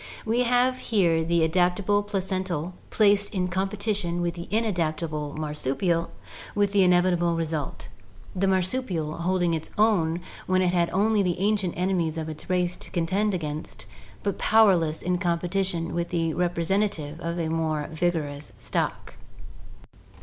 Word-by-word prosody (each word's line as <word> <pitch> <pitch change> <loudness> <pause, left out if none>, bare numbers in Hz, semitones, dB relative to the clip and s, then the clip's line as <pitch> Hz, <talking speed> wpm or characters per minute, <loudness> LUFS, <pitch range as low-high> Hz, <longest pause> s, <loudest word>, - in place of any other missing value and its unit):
We 230 +3 +1
have 250 +1 +3
here 170 -7 +2
the 170 0 +2
adapt 175 +3 +2
able 205 +1 +2
placental 185 -4 -2 0.2
placed 205 -1 +3
in 180 -1 0
competition 195 -1 -1
with 170 0 -1
the 170 0 -8
inadaptable 160 -8 -1
mar 155 -1 -3
supial, 165 +4 0 0.5
with 205 -1 +2
the 200 -1 +4
inevitable 175 -2 +3
result 160 -3 -3 0.2
— 95 - -21
the 195 +1 +1
marsupial 185 -4 0
holding 175 0 +1
its 160 -1 -3
own 180 -6 +2 0.3
when 185 0 +3
it 180 0 +1
had 170 -1 +2
only 210 +3 +2
the 180 -3 0
ancient 200 -2 0
enemies 175 -3 0
of 160 -1 -3
its 155 +2 -8
race 180 -1 +1
to - - -9
contend 190 +4 0
against, 155 -2 -5 0.4
but 200 -2 -2
powerless 185 -8 +4
in 180 0 0
competition 175 -1 -1
with 170 0 -2
the 165 -2 0
representative 175 -2 -1
of 170 0 -3
a 165 -2 -1
more 155 -2 -1
vigorous 155 -4 -2
stock. - - -3
175 Hz, 150 wpm, -26 LUFS, 165-195 Hz, 0.5 s, the